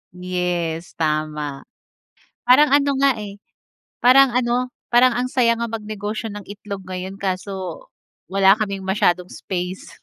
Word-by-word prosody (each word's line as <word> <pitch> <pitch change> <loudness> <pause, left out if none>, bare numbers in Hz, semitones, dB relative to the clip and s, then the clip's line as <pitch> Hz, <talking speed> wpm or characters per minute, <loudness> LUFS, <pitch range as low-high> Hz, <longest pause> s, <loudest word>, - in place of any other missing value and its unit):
Yes 180 -2 -3
tama. 150 -3 -2 0.8
Parang 285 +4 +6
ano 280 +1 +3
nga 275 -2 +4
eh, 205 -1 -8 0.6
parang 270 +2 +7
ano 250 0 +1 0.2
parang 245 0 +5
ang 250 +1 -1
saya 230 -3 +3
nga 235 - -2
mag 225 - -4
negosyo 215 +1 -4
ng 205 -1 -8
itlog 200 -1 -8
ngayon, 185 +1 -5
kaso, 190 - -4 0.4
wala 195 0 +5
kaming 200 -3 -3
masyadong 180 -2 +1
space. 180 0 -5
200 Hz, 130 wpm, -21 LUFS, 180-240 Hz, 0.8 s, parang